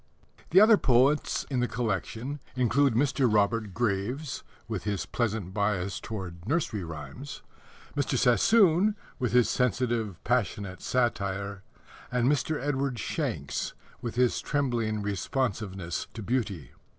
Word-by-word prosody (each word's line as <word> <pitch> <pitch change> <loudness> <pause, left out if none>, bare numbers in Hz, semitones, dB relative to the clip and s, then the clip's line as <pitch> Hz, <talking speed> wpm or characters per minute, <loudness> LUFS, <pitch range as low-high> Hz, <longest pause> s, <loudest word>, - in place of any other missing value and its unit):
The 185 - +7
other 215 +1 +8
poets 135 +2 +3
in 130 - +1
the 125 - +2
collection 115 +5 -3 0.2
include 130 +1 +3
Mr. 130 -1 +2
Robert 105 0 +2
Graves 120 +6 -1 0.3
(with 110 -6 -3
his 100 -1 -2
pleasant 110 -6 -2
bias 100 -2 0
towards 90 -5 -7
nursery 140 - 0
rhymes), 85 - -8 0.5
Mr. 140 -2 0
Sassoon 185 - +4 0.2
(with 125 -4 0
his 125 -1 +5
sensitive, 120 -5 0
passionate 105 -6 -1
satire), 100 -5 -1 0.5
and 125 -1 +2
Mr. 145 +2 +1
Edward 135 -2 -1
Shanks - - -3 0.3
(with 120 -2 -4
his 125 -1 +2
trembling 115 -7 0
responsiveness 100 -4 -2
to 110 - -5
beauty). 105 - -2
120 Hz, 120 wpm, -28 LUFS, 100-130 Hz, 0.5 s, other